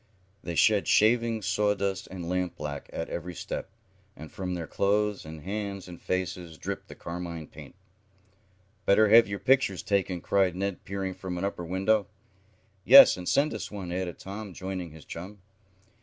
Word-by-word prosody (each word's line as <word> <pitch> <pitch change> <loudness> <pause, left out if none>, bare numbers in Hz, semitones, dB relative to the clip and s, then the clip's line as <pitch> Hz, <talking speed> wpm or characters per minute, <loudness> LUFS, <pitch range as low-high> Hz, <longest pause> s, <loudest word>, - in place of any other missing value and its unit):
They 85 - -4
shed 105 +2 +4
shavings, 115 -1 +3
sawdust 100 -1 0
and 90 -2 -7
lampblack 85 -5 -3
at 80 - -4
every 90 +1 -5
step, - - -5 0.5
and 80 +2 -10
from 90 -1 -4
their 85 -2 -4
clothes 105 +2 0
and 80 0 -9
hands 100 -1 -4
and 90 -1 -11
faces 90 -3 -3
dripped - - -5
the - - -11
carmine 85 -2 -6
paint. - - -13 1.1
"Better 105 +2 +5
have 115 -1 +8
your 100 0 -3
pictures 130 -6 +2
taken!" 95 -3 0
cried 95 0 +1
Ned, 100 0 -3
peering 95 -1 -3
from 95 -1 -6
an 90 - -2
upper 100 -3 -3
window. 95 +4 +1 0.8
"Yes, - - +10
and 90 -1 -4
send 145 +2 +2
us - - -5
one," 95 -4 -6
added 90 -1 -3
Tom, 100 -1 -8
joining 95 -2 -5
his 80 -1 -14
chum. 95 +5 -8
95 Hz, 160 wpm, -28 LUFS, 90-100 Hz, 1.1 s, Yes